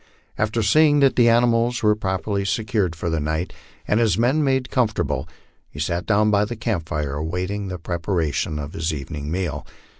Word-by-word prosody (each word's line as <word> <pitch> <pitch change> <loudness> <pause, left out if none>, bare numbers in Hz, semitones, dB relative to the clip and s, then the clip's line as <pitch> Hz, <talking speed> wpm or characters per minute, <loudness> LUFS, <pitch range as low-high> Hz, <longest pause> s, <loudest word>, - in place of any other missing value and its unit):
After 110 +1 0
seeing 145 +7 +5
that 135 -1 +4
the 120 -1 +5
animals 120 +1 +2
were 105 0 +5
properly 100 0 -2
secured 100 -3 -1
for 85 +2 -4
the 80 - 0
night, 80 +4 -2 0.3
and 105 - +2
his 115 -3 +2
men 130 +7 +2
made 130 -2 0
comfortable, 85 - 0 0.4
he 75 - -11
sat 85 +3 -2
down 105 0 +3
by 100 0 +3
the 115 +3 -4
camp 105 -7 -3
fire 75 -2 -2
awaiting 90 +7 -3
the 90 -1 -4
pre 85 +1 -4
paration 80 -4 -1
of 75 +1 -6
his 80 +1 -2
evening 75 0 -5
meal. 80 -5 -2
100 Hz, 185 wpm, -22 LUFS, 80-115 Hz, 0.4 s, seeing